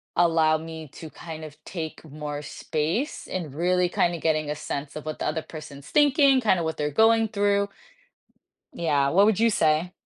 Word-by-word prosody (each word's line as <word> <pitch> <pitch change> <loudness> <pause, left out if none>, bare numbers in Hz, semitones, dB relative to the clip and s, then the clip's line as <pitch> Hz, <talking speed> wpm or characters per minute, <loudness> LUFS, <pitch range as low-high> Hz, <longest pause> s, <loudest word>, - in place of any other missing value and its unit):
allow 165 -2 +4
me 160 -1 -8
to 160 - -9
kind 160 0 -9
of 150 -2 -10
take 160 -4 -6
more 150 -1 -6
space 160 - -3
and 175 -6 -4
really 180 +2 +2
kind 175 -1 +1
of 165 - -8
getting 155 -2 +1
a 150 - -1
sense 140 -1 -5
of 155 - -6
what 155 - -4
the - - -2
other 155 +1 -1
person's 150 -3 -10
thinking, 280 -2 +4
kind 210 -6 +3
of 165 - -2
what 160 - -3
they're 150 0 -1
going 225 +6 +4
through. 200 -1 +1 1.1
Yeah, 145 -5 +1
what 195 +7 +5
would 215 -2 +2
you 230 +1 +4
say? 160 -2 +1
160 Hz, 190 wpm, -25 LUFS, 155-200 Hz, 1.1 s, what